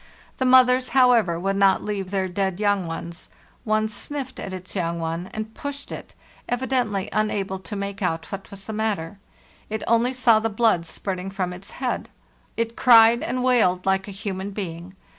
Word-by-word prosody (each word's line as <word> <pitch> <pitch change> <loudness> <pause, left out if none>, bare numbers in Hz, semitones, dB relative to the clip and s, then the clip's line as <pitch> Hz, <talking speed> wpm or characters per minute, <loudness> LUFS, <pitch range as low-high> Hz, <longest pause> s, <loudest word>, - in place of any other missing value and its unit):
The 260 - +2
mothers, 255 0 +5
however, 230 -10 +4
would 195 +2 -1
not 195 -1 +4
leave 200 -3 -3
their 190 -1 0
dead 190 0 -2
young 205 -4 +1
ones. 170 +1 -7 0.4
One 215 0 +2
sniffed 260 +4 -5
at 195 - -5
its 185 +1 -7
young 170 -2 -1
one, 165 +3 -3
and 220 0 -5
pushed 285 0 -6
it, - - -8 0.3
evidently 245 -6 0
unable 200 -3 -1
to 205 +3 -7
make 200 0 -4
out 165 -3 -2
what 195 0 -6
was 195 -1 -10
the 220 - -6
matter; 205 -4 -2 0.5
it 220 0 -3
only 235 +2 +3
saw 245 -4 +4
the 225 +1 -1
blood 210 -6 +2
spurting 190 +1 -4
from 185 -2 -3
its 185 +2 -10
head. 255 -2 -3 0.5
It 230 0 -1
cried 235 -1 +7
and 255 0 -2
wailed 220 -8 +3
like 190 0 +1
a - - -6
human 195 -1 -4
being. 185 -2 -6
200 Hz, 180 wpm, -24 LUFS, 185-230 Hz, 0.5 s, cried